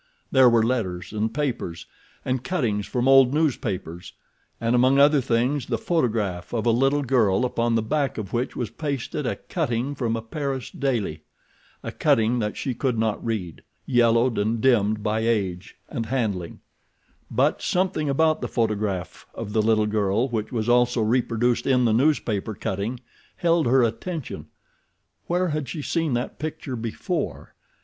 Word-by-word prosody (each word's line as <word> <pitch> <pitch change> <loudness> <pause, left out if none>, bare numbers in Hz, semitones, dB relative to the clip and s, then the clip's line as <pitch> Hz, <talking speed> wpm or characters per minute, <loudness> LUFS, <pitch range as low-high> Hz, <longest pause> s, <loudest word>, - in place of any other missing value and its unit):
There 130 -2 +6
were 115 -1 +4
letters 95 -7 -2
and 110 +1 -1
papers 125 - -3 0.4
and 130 -1 -1
cuttings 120 - -1
from 125 0 -1
old 135 0 +6
newspapers, 100 - -2 0.5
and 115 +1 0
among 130 +2 +4
other 145 0 +5
things 125 +2 0
the 115 - 0
photograph 110 - -1
of 110 - -1
a 120 - +4
little 135 +5 +2
girl 120 -4 +2
upon 120 -1 0
the 115 - +1
back 140 +4 -1
of 105 -4 -6
which 120 +2 -1
was 120 -4 -3
pasted 140 -1 -3
a - - -1
cutting 120 +4 -2
from 120 -4 -1
a 115 - -4
Paris 135 +1 -4
daily—a 100 - -5
cutting 115 +2 +2
that 105 -2 -2
she 130 - -2
could 125 -1 -1
not 110 -1 -1
read, 100 - -3 0.2
yellowed 120 -1 +3
and 110 +3 0
dimmed 110 -4 +2
by 110 0 0
age 100 -5 -1
and 115 -1 -4
handling—but 110 -9 -3
something 180 -5 0
about 155 +3 +2
the - - -2
photograph 105 -5 -2
of 105 -2 -6
the 110 - +3
little 110 0 +3
girl 105 +2 +1
which 110 -3 -3
was 115 -3 -2
also 120 -1 +3
reproduced 120 +1 +1
in 125 -2 +3
the 110 - +3
newspaper 115 -6 +1
cutting 100 +7 -3 0.4
held 170 -4 +2
her 130 +1 +4
attention. 140 +6 -4 0.8
Where 180 +1 +1
had 150 -3 -3
she 155 -4 -5
seen 165 -5 0
that 120 - -4
picture 150 -4 -4
before? 115 -1 -4
120 Hz, 155 wpm, -24 LUFS, 110-135 Hz, 0.8 s, There